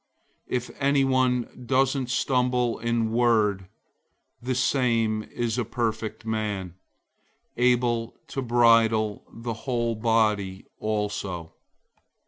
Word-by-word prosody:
If 125 Hz, -1 st, -2 dB
anyone 130 Hz, -3 st, +1 dB
doesn't 135 Hz, 0 st, +1 dB
stumble 125 Hz, -2 st, +1 dB
in 115 Hz, -1 st, 0 dB
word, 110 Hz, -5 st, +2 dB, 0.7 s
the 125 Hz, +1 st, -2 dB
same 115 Hz, -4 st, +1 dB
is 120 Hz, +2 st, -3 dB
a -, -, +1 dB
perfect 110 Hz, -1 st, -3 dB
man, 105 Hz, -5 st, -2 dB, 0.8 s
able 120 Hz, -2 st, +1 dB
to 135 Hz, -, -3 dB
bridle 115 Hz, -3 st, +3 dB
the 115 Hz, 0 st, -5 dB
whole 115 Hz, +1 st, -1 dB
body 110 Hz, -4 st, +1 dB
also. 105 Hz, -5 st, -3 dB
115 Hz, 95 wpm, -26 LUFS, 110-125 Hz, 0.8 s, bridle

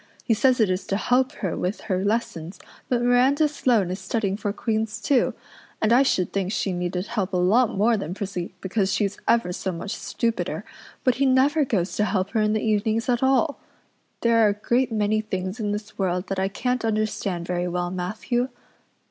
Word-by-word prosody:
He 230 Hz, -, +2 dB
says 250 Hz, +3 st, +3 dB
it 215 Hz, -4 st, +3 dB
is 185 Hz, +1 st, -2 dB
to 195 Hz, -, 0 dB
help 255 Hz, +4 st, +2 dB
her 185 Hz, -, 0 dB
with 185 Hz, +3 st, -2 dB
her 190 Hz, -3 st, -1 dB
lessons 200 Hz, -5 st, -2 dB, 0.3 s
but 240 Hz, -1 st, +1 dB
Miranda 255 Hz, +5 st, +4 dB
Sloane 240 Hz, -10 st, +1 dB
is 185 Hz, -, -4 dB
studying 195 Hz, +1 st, -1 dB
for 205 Hz, 0 st, -2 dB
Queen's 220 Hz, 0 st, -2 dB
too, 255 Hz, +4 st, +2 dB, 0.4 s
and 220 Hz, +1 st, +3 dB
I 250 Hz, -, +6 dB
should 185 Hz, -10 st, +1 dB
think 195 Hz, -1 st, -1 dB
she 195 Hz, -3 st, -1 dB
needed 180 Hz, +1 st, -2 dB
help 205 Hz, -4 st, -2 dB
a -, -, +2 dB
lot 205 Hz, +5 st, +3 dB
more 225 Hz, +3 st, +3 dB
than 180 Hz, -2 st, -4 dB
Prissy 190 Hz, -3 st, -4 dB
because 190 Hz, 0 st, 0 dB
she's 200 Hz, -1 st, -1 dB
ever 230 Hz, -7 st, +2 dB
so 190 Hz, -, -3 dB
much 180 Hz, +4 st, -5 dB
stupider, 230 Hz, -1 st, -2 dB, 0.4 s
but 255 Hz, -2 st, +2 dB
he 275 Hz, -, +5 dB
never 275 Hz, +4 st, +4 dB
goes 195 Hz, -7 st, -1 dB
to 210 Hz, -, +2 dB
help 195 Hz, -2 st, -1 dB
her 225 Hz, -, +1 dB
in 210 Hz, 0 st, +2 dB
the 215 Hz, -, 0 dB
evenings 220 Hz, +2 st, +1 dB
at 240 Hz, -1 st, +2 dB
all. 270 Hz, +3 st, +2 dB, 0.6 s
There 230 Hz, -1 st, +4 dB
are 210 Hz, -, +5 dB
a -, -, +1 dB
great 240 Hz, +4 st, 0 dB
many 215 Hz, 0 st, +1 dB
things 190 Hz, 0 st, -4 dB
in 210 Hz, -2 st, -1 dB
this 210 Hz, 0 st, -6 dB
world 180 Hz, -1 st, -1 dB
that 195 Hz, -, -1 dB
I 190 Hz, -, +1 dB
can't 250 Hz, +5 st, -2 dB
understand 210 Hz, -5 st, -1 dB
very 180 Hz, 0 st, -1 dB
well, 175 Hz, 0 st, -2 dB
Matthew." 215 Hz, +7 st, -2 dB
210 Hz, 200 wpm, -24 LUFS, 190-235 Hz, 0.6 s, I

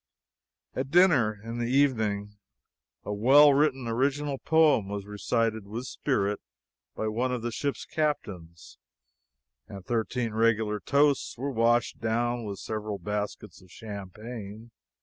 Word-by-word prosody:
At 130 Hz, +1 st, -3 dB
dinner 145 Hz, -, +4 dB
in 115 Hz, +1 st, -5 dB
the 120 Hz, 0 st, -1 dB
evening, 110 Hz, -7 st, +1 dB, 0.7 s
a 105 Hz, -, -4 dB
well 140 Hz, +7 st, +6 dB
written 135 Hz, -3 st, +1 dB
original 135 Hz, +4 st, 0 dB
poem 155 Hz, -11 st, +3 dB
was 100 Hz, -1 st, -4 dB
recited 110 Hz, +1 st, -1 dB
with 115 Hz, +5 st, -5 dB
spirit 105 Hz, -7 st, -1 dB, 0.6 s
by 110 Hz, -, -2 dB
one 120 Hz, +4 st, -1 dB
of 125 Hz, -2 st, -3 dB
the 120 Hz, -, -2 dB
ship's 140 Hz, +4 st, -3 dB
captains, 90 Hz, -, -4 dB, 0.9 s
and 95 Hz, -2 st, -10 dB
thirteen 115 Hz, 0 st, -1 dB
regular 110 Hz, -1 st, +1 dB
toasts 140 Hz, +6 st, +1 dB
were 140 Hz, +4 st, -3 dB
washed 120 Hz, 0 st, +2 dB
down 120 Hz, +1 st, -1 dB
with 100 Hz, -2 st, -5 dB
several 110 Hz, 0 st, -4 dB
baskets 105 Hz, -1 st, -5 dB
of 95 Hz, -, -19 dB
champagne. 105 Hz, +2 st, -8 dB
115 Hz, 130 wpm, -28 LUFS, 105-130 Hz, 0.9 s, well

